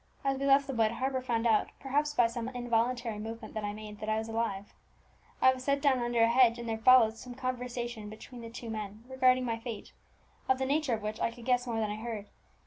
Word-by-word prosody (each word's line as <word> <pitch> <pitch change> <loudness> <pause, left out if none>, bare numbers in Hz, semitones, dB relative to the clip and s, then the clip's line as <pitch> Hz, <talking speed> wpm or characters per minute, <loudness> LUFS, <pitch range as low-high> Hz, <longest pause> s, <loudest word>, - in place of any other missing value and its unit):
As 270 -1 +1
we 275 - 0
left 275 0 +5
the 270 - -4
wood, 225 -2 +2
Harper 260 +2 -1
found 235 -2 -1
out, 220 -2 +3
perhaps 290 +2 0
by 240 - +5
some 230 +1 -3
involuntary 240 -2 -1
movement 225 +2 -7
that 215 - -4
I 205 - -1
made, 210 0 -9
that 215 - -4
I 215 - +1
was 220 0 -3
alive. 225 -3 -3 0.7
I 260 - +7
was 255 -1 -8
set 280 +1 +1
down 275 -3 +3
under 240 -1 +2
a - - +6
hedge, 235 0 +5
and 235 0 -6
there 225 -1 -2
followed 230 -2 +6
some 245 +1 -9
conversation 245 -3 -4
between 235 +3 -10
the 230 - -8
two 230 0 -7
men 215 0 -6
regarding 255 -1 +3
my 230 -1 -2
fate, 230 -3 -7 0.6
of 260 - +4
the 265 - -1
nature 285 -2 +1
of 215 - -8
which 215 +1 -4
I - - +1
could 235 0 -12
guess 250 0 +2
more 230 -2 -1
than 215 -1 -1
I 210 - -4
heard. 220 -2 -5
235 Hz, 240 wpm, -31 LUFS, 225-255 Hz, 0.7 s, I